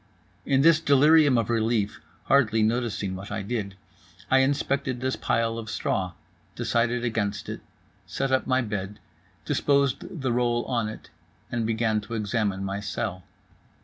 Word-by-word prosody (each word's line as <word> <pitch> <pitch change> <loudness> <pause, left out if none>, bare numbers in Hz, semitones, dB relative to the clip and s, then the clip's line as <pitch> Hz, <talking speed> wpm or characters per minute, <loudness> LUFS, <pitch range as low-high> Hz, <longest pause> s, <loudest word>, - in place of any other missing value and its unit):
In 135 0 +3
this 165 +1 +6
delirium 145 -1 +5
of 115 0 0
relief 115 -1 0 0.2
(hardly 115 -5 +3
noticing 110 -4 -1
what 95 +2 -8
I 105 -1 -3
did) 100 -2 -3 0.6
I 130 - +6
inspected 140 -1 0
the 130 +1 -1
pile 115 0 0
of 110 -1 -7
straw, 90 -3 -1 0.4
decided 120 +1 0
against 105 -3 -2
it, - - -6 0.5
set 135 - -2
up 130 - +1
my 130 0 +2
bed, 105 -2 -4 0.5
disposed 140 +2 0
the 130 -3 +1
roll 120 -1 +1
on 115 -4 -1
it, 110 - -11 0.4
and 115 -2 -1
began 110 -1 +1
to 115 +3 -6
examine 105 -3 -1
my 100 +1 -3
cell. 95 -2 -4
115 Hz, 145 wpm, -26 LUFS, 105-130 Hz, 0.6 s, this